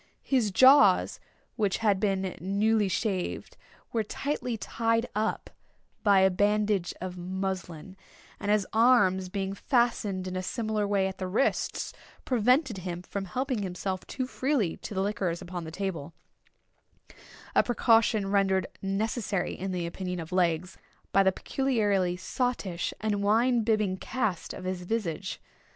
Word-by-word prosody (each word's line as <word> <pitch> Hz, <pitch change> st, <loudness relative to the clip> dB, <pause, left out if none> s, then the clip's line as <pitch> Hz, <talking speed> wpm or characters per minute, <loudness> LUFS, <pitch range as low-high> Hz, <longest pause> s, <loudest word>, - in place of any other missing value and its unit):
His 250 Hz, -6 st, +2 dB
jaws, 260 Hz, +8 st, +6 dB, 0.4 s
which 205 Hz, -4 st, +1 dB
had 205 Hz, -4 st, +2 dB
been 195 Hz, -2 st, 0 dB
newly 205 Hz, +3 st, +2 dB
shaved, 190 Hz, 0 st, -2 dB, 0.4 s
were 230 Hz, -, +2 dB
tightly 250 Hz, +2 st, -3 dB
tied 230 Hz, +2 st, 0 dB
up 215 Hz, +1 st, -2 dB, 0.5 s
by 200 Hz, -2 st, +5 dB
a 190 Hz, 0 st, +5 dB
bandage 205 Hz, -1 st, +1 dB
of 180 Hz, 0 st, -6 dB
muslin; 185 Hz, -1 st, -4 dB, 0.4 s
and 205 Hz, -, -3 dB
his 210 Hz, -2 st, +3 dB
arms 215 Hz, -6 st, +4 dB
being 195 Hz, 0 st, -3 dB
fastened 210 Hz, -5 st, 0 dB
in 185 Hz, -, -4 dB
a 185 Hz, -, -1 dB
similar 215 Hz, +1 st, -1 dB
way 200 Hz, -1 st, +2 dB
at 190 Hz, -, -7 dB
the 185 Hz, -, -2 dB
wrists, 205 Hz, +9 st, 0 dB, 0.3 s
prevented 250 Hz, -, +2 dB
him 180 Hz, -1 st, -5 dB
from 195 Hz, +2 st, -5 dB
helping 255 Hz, +4 st, -2 dB
himself 185 Hz, 0 st, -3 dB
too 260 Hz, -, -3 dB
freely 255 Hz, -, 0 dB
to 210 Hz, -, -8 dB
the 190 Hz, -, +1 dB
liquors 190 Hz, -4 st, -1 dB
upon 175 Hz, -2 st, -6 dB
the -, -, -6 dB
table; 170 Hz, -4 st, -4 dB, 1.4 s
a -, -, +6 dB
precaution 225 Hz, -3 st, +2 dB
rendered 190 Hz, -2 st, +2 dB, 0.2 s
necessary, 200 Hz, -1 st, -1 dB
in 190 Hz, +1 st, -4 dB
the 180 Hz, -2 st, -2 dB
opinion 180 Hz, +1 st, -4 dB
of 165 Hz, -1 st, -7 dB
Legs, 180 Hz, 0 st, 0 dB, 0.3 s
by 195 Hz, -, +5 dB
the 190 Hz, 0 st, +4 dB
peculiarly 205 Hz, -8 st, 0 dB
sottish 195 Hz, -4 st, -2 dB
and 210 Hz, -2 st, 0 dB
wine 230 Hz, +4 st, +3 dB
bibbing 215 Hz, -4 st, +1 dB
cast 215 Hz, -5 st, -2 dB
of -, -, -8 dB
his 185 Hz, -1 st, -3 dB
visage. 185 Hz, -2 st, -3 dB
195 Hz, 140 wpm, -28 LUFS, 185-225 Hz, 1.4 s, jaws